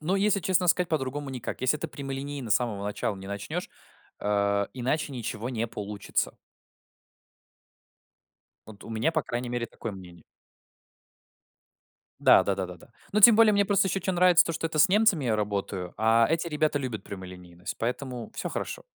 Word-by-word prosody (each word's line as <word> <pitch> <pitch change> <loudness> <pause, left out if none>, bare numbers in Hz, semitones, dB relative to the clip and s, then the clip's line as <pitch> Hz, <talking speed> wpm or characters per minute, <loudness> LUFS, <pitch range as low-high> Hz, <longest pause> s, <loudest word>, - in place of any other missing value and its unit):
Ну, 170 +5 0
если 200 0 +2
честно 185 0 +1
сказать, 180 0 +3
по-другому 145 -2 -2
никак. 125 -3 -5
Если 130 +4 +2
ты 160 - -4
прямолинейно 140 -3 -6
с 105 - +6
самого 110 -5 -3
начала 105 0 -2
не 95 0 -10
начнёшь, 100 0 -4 0.5
э, 100 -1 +1
иначе 135 +4 -2
ничего 115 -1 -4
не 115 -2 -2
получится. 105 -2 -3 2.3
Вот 105 -2 -13
у - - -10
меня, 115 +9 0
по 155 - +1
крайней 120 -1 -4
мере, 120 -1 -2
такое 115 -1 -7
мнение. 90 -3 -12 2.0
Да - - +7
да 100 - +1
да 95 -1 -3
да 90 0 -9
да. - - -17 0.3
Ну, 210 - +2
тем 225 +2 +10
более 220 -1 +6
мне 200 0 +3
просто 195 -1 +2
ещё 195 - 0
чё 190 +1 -2
нравится- 180 -1 +5
то, 165 - -1
что 165 0 -2
это 160 -1 -4
с 150 - +7
немцами 200 - +3
я 110 -3 +1
работаю, 100 -3 -3
а 115 +1 +4
эти 165 +1 0
ребята 150 -1 +1
любят 125 -6 -4
прямолинейность, 90 -2 -8
поэтому 125 +1 -4
всё - - -3
хорошо. - - -4
125 Hz, 175 wpm, -27 LUFS, 105-165 Hz, 2.3 s, тем